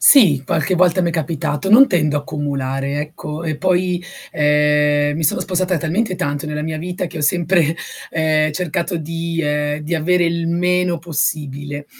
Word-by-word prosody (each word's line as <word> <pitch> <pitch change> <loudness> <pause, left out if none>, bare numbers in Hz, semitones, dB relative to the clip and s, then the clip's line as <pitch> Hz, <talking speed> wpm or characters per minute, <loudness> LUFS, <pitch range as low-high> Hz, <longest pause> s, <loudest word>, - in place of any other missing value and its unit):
Sì, 180 - +6
qualche 160 +7 0
volta 180 0 +3
m'è 170 -1 +1
capitato. 160 +2 -2
Non 255 +6 +8
tendo 155 -4 +1
a - - 0
accumulare 140 -1 -3
ecco, 150 +1 -6
e 155 -2 -2
poi, 180 0 0 0.3
uhm, 150 0 +2
mi 160 - -2
sono - - +2
spostata 185 -1 0
talmente 185 +5 -1
tanto 145 0 -3
nella 150 0 -3
mia 155 0 -3
vita 180 +2 -4
che 165 -1 -8
ho - - -4
sempre, 165 +1 +2 0.3
uhm, 155 -1 +1
cercato 170 +2 -2
di 165 +1 -3
uhm, 150 0 -1
di 155 +3 -3
avere 175 +2 +2
il 170 0 -1
meno 180 0 +1
possibile. 145 -3 -3
160 Hz, 165 wpm, -19 LUFS, 150-175 Hz, 0.3 s, Non